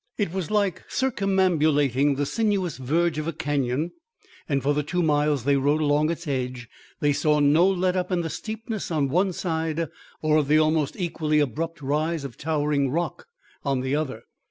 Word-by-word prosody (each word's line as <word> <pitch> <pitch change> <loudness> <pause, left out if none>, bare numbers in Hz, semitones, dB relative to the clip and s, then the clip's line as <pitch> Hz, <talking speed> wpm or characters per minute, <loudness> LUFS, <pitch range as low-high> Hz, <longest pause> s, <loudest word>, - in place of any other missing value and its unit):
It 200 -6 -1
was 190 -4 -3
like 205 -4 +1
circumambulating 155 - +2
the 145 +1 0
sinuous 200 - 0
verge 155 +5 0
of 155 - -3
a 165 - -2
canyon; 145 +2 -1 0.6
and 140 -2 0
for 145 +2 +2
the 150 - +1
two 175 +4 -1
miles 150 -3 +2
they 140 +1 +3
rode 145 +3 +2
along 150 0 +2
its 170 0 -4
edge 125 -3 -3 0.3
they 145 -1 +3
saw 150 +1 +2
no 150 +5 +5
let 185 -1 +1
up 185 +1 -1
in 180 -1 +1
the 165 - -3
steepness 220 0 -5
on 150 -5 0
one 185 +6 +2
side 160 -2 -2 0.3
or 155 0 +3
of 150 -3 +1
the 150 +2 +4
almost 155 -2 +2
equally 160 -4 -1
abrupt 155 +4 -2
rise 155 +3 0
of 135 -4 -7
towering 145 -2 0
rock 170 +6 -3 0.4
on 135 -3 0
the 130 +2 -1
other. 135 -7 -3
155 Hz, 180 wpm, -25 LUFS, 145-170 Hz, 0.6 s, no